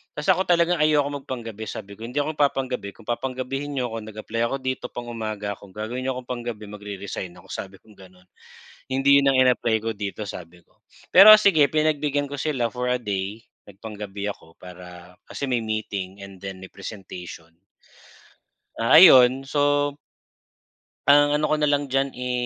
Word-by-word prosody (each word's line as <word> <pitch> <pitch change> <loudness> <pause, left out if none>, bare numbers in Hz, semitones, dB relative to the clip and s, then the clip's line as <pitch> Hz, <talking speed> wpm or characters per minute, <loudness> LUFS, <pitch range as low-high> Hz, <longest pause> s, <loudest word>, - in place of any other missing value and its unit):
Ta's 150 - -5
ako 190 - +1
talaga 175 -1 +3
ayokong 145 -2 +2
mag - - -37
pang-gabi. 115 -4 -6
Sabi 100 - -8
ko, - - -9
hindi 125 +5 -3
ako 155 +1 -4
nagpapang-gabi. 130 -7 0
Kung 115 - -17
papang-gabihin 135 +3 -3
niyo 125 -2 -2
'ko, 115 - -4
nag-apply 110 +1 -5
ako 135 - -2
dito 130 0 -3
pang-umaga 110 -4 -5
ako, 100 - -15
kung - - -23
gagawin 110 +4 -4
niyo 130 - -1
ako - - -5
pang-gabi, 120 -3 -5
magre-resign 100 -3 -7
ako, 90 +2 -17
sabi 95 0 -7
kong 110 - -20
gano’n. 90 -1 -17 0.7
Hindi 135 +2 +4
yun 140 0 +3
ang - - +2
in-apply 125 -3 +2
ko 115 - -2
dito, 100 +1 -5
sabi 85 -2 -10
ko. - - -35 0.4
Pero 205 +3 +11
sige 185 -9 +4
pinagbigyan 150 -2 0
ko 145 - -6
sila 130 -5 -1
for 125 0 -3
a 125 - +1
day, 100 +1 -4 0.3
nagpang-gabi 105 -1 -7
ako 80 -4 -12
para 90 0 -12
kasi 140 - -5
may 125 - +2
meeting 100 -3 -4
and 95 -1 -12
then 95 -1 -6
may 95 - -10
presentation. 90 -4 -10 1.2
Ah, 115 +6 +6
ayun, 130 -5 +7
so 145 0 +1 1.1
Ang 145 +1 +5
ano 150 - -1
ko - - +3
na 150 - +2
lang 145 0 +1
diyan 135 0 0
ay 125 0 -3
120 Hz, 175 wpm, -23 LUFS, 100-140 Hz, 1.2 s, Pero